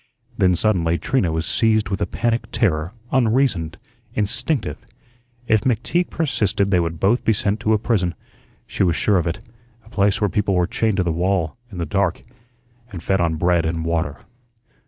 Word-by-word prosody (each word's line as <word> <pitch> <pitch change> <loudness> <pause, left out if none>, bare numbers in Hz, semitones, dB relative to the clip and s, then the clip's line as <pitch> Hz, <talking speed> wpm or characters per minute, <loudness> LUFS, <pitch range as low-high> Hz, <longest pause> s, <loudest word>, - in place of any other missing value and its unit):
Then 90 -1 +3
suddenly 85 -4 +1
Trina 95 - 0
was 80 +1 -1
seized 110 -3 +2
with 100 - -3
a - - +1
panic 115 -1 -1
terror, 90 -6 0 0.2
unreasoned, 115 -10 +1 0.4
instinctive. 115 +6 -1 0.6
If 110 -3 +3
McTeague 130 +10 0
persisted 105 - 0
they 90 - +4
would 85 -1 -2
both 105 +8 +2
be 110 - +3
sent 105 +1 -1
to 110 0 +1
a - - +4
prison, 100 -6 0 0.5
she - - -5
was 85 -3 +3
sure 100 0 +2
of 85 - -2
it; 85 - -3 0.4
a - - -16
place 100 -3 +2
where 105 - +2
people 100 -2 0
were 90 -1 +3
chained 110 +2 0
to 95 - +2
the 85 - 0
wall, 85 -1 0 0.2
in 95 - -8
the 85 - -2
dark, 95 +2 0 0.7
and 85 -4 -7
fed 95 +1 +1
on 80 -2 +1
bread 85 +1 +2
and 80 0 -2
water. 80 -4 -2
95 Hz, 180 wpm, -21 LUFS, 85-110 Hz, 0.7 s, they